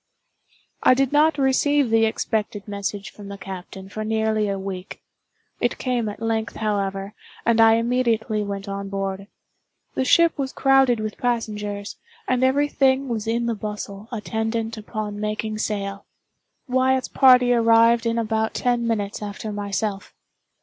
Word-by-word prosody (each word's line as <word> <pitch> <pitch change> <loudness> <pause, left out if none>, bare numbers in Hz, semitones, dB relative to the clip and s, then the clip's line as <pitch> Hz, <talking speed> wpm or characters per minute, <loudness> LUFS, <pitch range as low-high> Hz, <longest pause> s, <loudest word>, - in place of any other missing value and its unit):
I 255 - +6
did 270 0 +1
not 300 +1 +4
receive 275 -1 +2
the 225 0 +4
expected 215 -2 -2
message 200 0 -4
from 205 -1 -11
the 200 0 -7
captain 190 0 -8
for 215 +2 -5
nearly 220 -1 0
a 195 - -1
week. 190 -1 -6 0.6
It - - 0
came 245 -4 -1
at 205 - -8
length, 225 0 -1
however, 200 -2 -2 0.3
and 230 0 +4
I 225 0 +7
immediately 230 -2 +1
went 200 0 -4
on 200 0 -4
board. 195 0 -3 0.7
The - - 0
ship 335 +4 +4
was 270 -1 -2
crowded 270 -3 +4
with 215 -1 -5
passengers, 210 -4 -2 0.3
and 255 0 +1
every 280 +3 +3
thing 270 -1 +2
was 225 -2 -3
in 235 +1 0
the 235 - 0
bustle 210 -1 -6
attendant 225 0 -2
upon 210 -1 -5
making 215 0 -3
sail. 200 -2 -3 0.6
Wyatt's 260 0 +2
party 250 -2 +5
arrived 230 0 +4
in 230 0 0
about 220 -1 -1
ten 240 -1 0
minutes 210 -3 -2
after 210 +1 -5
myself. 205 0 -3
220 Hz, 150 wpm, -23 LUFS, 205-245 Hz, 0.7 s, I